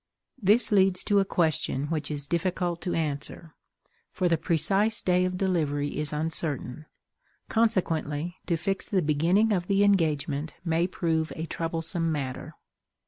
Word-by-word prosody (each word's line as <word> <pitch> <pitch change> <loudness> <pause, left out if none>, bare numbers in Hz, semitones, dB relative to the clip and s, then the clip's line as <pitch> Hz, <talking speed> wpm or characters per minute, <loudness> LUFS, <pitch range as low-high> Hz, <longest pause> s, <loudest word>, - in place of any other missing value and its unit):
This 210 +5 +5
leads 190 -2 +3
to 205 -1 +3
a 195 - +2
question 155 -6 0
which 155 -2 -2
is 145 -2 0
difficult 175 +1 -1
to 175 - -2
answer, 155 +1 -4 0.6
for 185 -1 -1
the 170 - +3
precise 195 +7 +1
day 180 0 +2
of 180 0 -2
delivery 150 -7 -1
is 150 -1 -1
uncertain; 155 -2 -3 0.6
consequently 175 -7 0
to 170 - +1
fix 195 +4 -2
the 190 -4 +1
beginning 170 +9 +2
of 180 -2 -1
the 200 0 +3
engagement 155 -6 0
may 165 +1 +1
prove 160 -3 -1
a 160 - -4
troublesome 165 +1 -1
matter. 135 -4 -5
165 Hz, 140 wpm, -27 LUFS, 155-185 Hz, 0.6 s, This